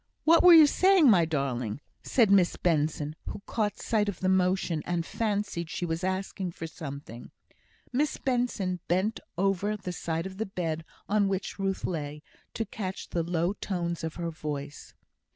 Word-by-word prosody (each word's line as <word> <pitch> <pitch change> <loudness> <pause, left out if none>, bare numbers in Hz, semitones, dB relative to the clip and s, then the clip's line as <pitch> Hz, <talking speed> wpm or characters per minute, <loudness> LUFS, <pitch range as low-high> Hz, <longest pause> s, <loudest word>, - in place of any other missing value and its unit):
"What 330 +1 +6
were 355 -1 +9
you 315 -2 +10
saying, 370 -2 +5
my 175 -5 +5
darling?" 135 -7 -2 0.2
said 230 -6 +3
Miss 190 -3 +4
Benson, 155 -2 0
who 200 - -6
caught 210 -2 -1
sight 210 -3 0
of 190 - -6
the 185 - +1
motion, 185 -3 +1
and 175 -1 -2
fancied 205 -7 -2
she 175 - -3
was 165 +1 -3
asking 190 -1 -2
for 165 - -6
something. 140 -6 -8 0.6
Miss 285 +3 +1
Benson 240 -8 -1
bent 190 +6 +1 0.2
over 195 +2 +1
the 185 -3 -5
side 165 0 -3
of 190 0 -7
the 220 - -1
bed 165 -4 -3 0.2
on 205 -1 +2
which 195 +1 -3
Ruth 195 -1 -1
lay, 150 -3 -4 0.3
to 225 - -1
catch 190 -2 -5
the 170 - 0
low 170 +2 0
tones 170 -5 -3
of 160 -1 -4
her 170 -1 -3
voice. 145 -2 -6
185 Hz, 170 wpm, -28 LUFS, 160-205 Hz, 0.6 s, you